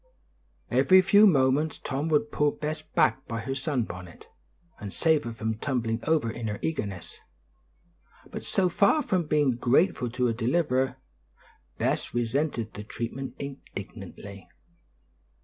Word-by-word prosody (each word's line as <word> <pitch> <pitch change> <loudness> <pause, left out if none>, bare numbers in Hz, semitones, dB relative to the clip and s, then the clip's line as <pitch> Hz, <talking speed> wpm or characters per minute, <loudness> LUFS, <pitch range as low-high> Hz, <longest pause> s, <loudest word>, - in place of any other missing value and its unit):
Every 185 0 +6
few 205 +3 +7
moments 140 -1 +2
Tom 145 +3 -3
would 150 -1 +2
pull 150 -1 +2
Bess 155 0 -4
back 150 -3 +1
by 115 -1 -3
her 135 +4 -3
sun 135 -2 -1
bonnet, 90 -4 -9 0.5
and 100 -1 -6
save 155 - +2
her 120 - -3
from 110 -1 -3
tumbling 115 -4 -1
over 155 -8 +2
in 115 0 -5
her 105 -1 -3
eagerness; 100 - -4 1.1
but - - -5
so 190 -2 +1
far 200 - +3
from 180 -4 0
being 145 -5 +2
grateful 125 +2 +2
to 125 +2 -1
her 120 - +2
deliverer, 130 +1 0 0.8
Bess - - -1
resented 120 -1 -1
the 105 - -7
treatment 120 +5 -5
indignantly. 100 -7 -9
130 Hz, 135 wpm, -27 LUFS, 115-155 Hz, 1.1 s, few